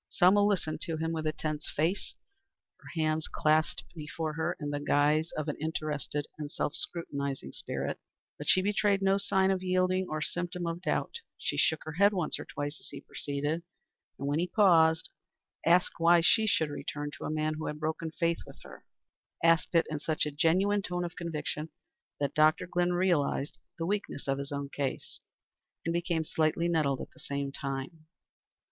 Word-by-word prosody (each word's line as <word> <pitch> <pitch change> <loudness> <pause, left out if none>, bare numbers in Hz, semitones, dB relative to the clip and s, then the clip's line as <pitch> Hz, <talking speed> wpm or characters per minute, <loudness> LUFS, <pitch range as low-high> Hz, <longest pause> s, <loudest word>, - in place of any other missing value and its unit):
Selma 190 +3 +5
listened 185 -7 +1
to 165 -3 -2
him 160 +1 -1
with 160 -1 -2
a - - +2
tense 155 0 -4
face, 165 +6 -1 0.6
her - - -13
hands 155 0 +1
clasped 155 +1 +2
before 155 -1 -4
her 165 +3 -1
in 145 -2 -3
the 145 - -1
guise 150 +2 +2
of 155 0 -2
an 150 - -1
interested 150 -2 -2
and 150 -1 -5
self 145 - -1
scrutinizing 140 - -3
spirit. - - -4 0.4
But - - -6
she 185 - +6
betrayed 205 -1 +2
no 195 +1 +4
sign 190 -1 +3
of 190 -1 0
yielding, 185 0 +1
or 155 - -2
symptom 175 +2 -2
of 170 +1 -3
doubt. 465 - -1 0.2
She - - -2
shook 160 -2 +2
her 155 - -5
head 200 +6 +4
once 180 -4 0
or - - -6
twice 145 +1 -5
as - - -11
he 140 - -7
proceeded, 145 +3 -2 0.6
and, 140 - -4
when 145 +2 +1
he 175 - +1
paused, 165 -5 +4 0.6
asked 175 +1 +4
why 170 +1 +6
she 220 +6 +4
should 160 -7 +2
return 145 0 -4
to - - -5
a - - -2
man 155 0 0
who 155 +1 -4
had 150 - -4
broken 160 +1 -2
faith 170 +1 0
with - - -12
her; - - -12 0.6
asked 165 +1 +4
it 165 - +5
in 155 -1 -3
such 155 +1 0
a 150 - -2
genuine 185 +7 +3
tone 180 -2 -2
of 175 - -6
conviction 160 -2 -3 0.5
that 140 -1 0
Dr. 155 +3 +4
Glynn 175 0 +1
realized 175 -6 +1 0.2
the 165 - -2
weakness 200 -6 -2
of 135 0 0
his 140 +1 -5
own 140 0 -3
case, 140 -2 -4 0.7
and 165 - 0
became 170 -1 0
slightly 160 +2 +1
nettled 150 -6 +1
at - - -8
the - - -19
same 140 0 -3
time. 140 +4 -5
160 Hz, 185 wpm, -30 LUFS, 150-175 Hz, 0.7 s, she